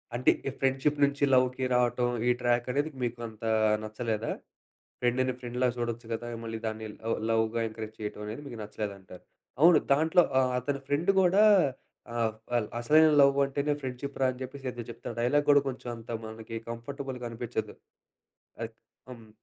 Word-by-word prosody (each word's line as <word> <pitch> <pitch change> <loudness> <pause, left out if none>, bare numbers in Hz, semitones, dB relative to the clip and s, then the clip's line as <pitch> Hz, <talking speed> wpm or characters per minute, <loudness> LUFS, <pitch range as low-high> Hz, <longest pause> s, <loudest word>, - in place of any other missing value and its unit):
అంటే 125 - +4 0.2
ఈ - - +2
ఫ్రెండ్షిప్ 135 +2 +1
నుంచి 140 0 +2
లవ్‌కి 130 0 +3
రావటం. 120 0 +2 0.2
ఈ - - +4
ట్రాక్ 120 0 +1
అనేది 145 +4 0
మీకు 120 0 -2
అంతా 110 0 -5 0.3
నచ్చలేదా? 110 0 -3 0.7
ఫ్రెండ్‌ని 130 +1 +1
ఫ్రెండ్‌లాగా 125 0 -1
చూడొచ్చు 115 -1 -3
కదా! 120 +1 -3 0.2
మళ్లీ 115 0 -4
దాన్ని 110 0 -4 0.2
లవ్, 115 - 0
లవ్‌గా 115 +1 +1
ఎంకరేజ్ 110 0 -8
చేయటమనేది 105 +4 -5
మీకు 120 -4 -8
నచ్చలేదంటారు. 100 -3 -7 0.4
అవును. 170 +1 +8
దాంట్లో 160 +5 +5 0.2
ఆహ్, 130 -1 +1
అతని 140 +2 -2
ఫ్రెండ్ 150 +7 +2
కూడా 190 +3 +5 0.7
ఆహ్, 115 -2 +1 0.2
ఆ! - - +5 0.2
"అసలైన 155 +6 +6
లవ్ 140 0 +5
అంటేనే 140 +2 -1
ఫ్రెండ్షిప్ 130 +2 -5
రా" 130 - +5
అని 125 - -13
చెప్పేసి 130 0 -6
ఏదో 120 -1 -7
చెప్తాడు. 115 0 -7
డైలాగ్ 145 +5 +2
కూడా 145 0 +7
కొంచెం 130 -1 -6
అంత 115 +1 -11 0.2
మనకి 110 +1 -8
కంఫర్టబుల్‌గా 125 +1 -6
అనిపించదు. 115 -2 -4 0.9
అది 115 - -4 0.4
హ్మ్. 115 -3 -11
120 Hz, 155 wpm, -29 LUFS, 115-140 Hz, 0.9 s, అవును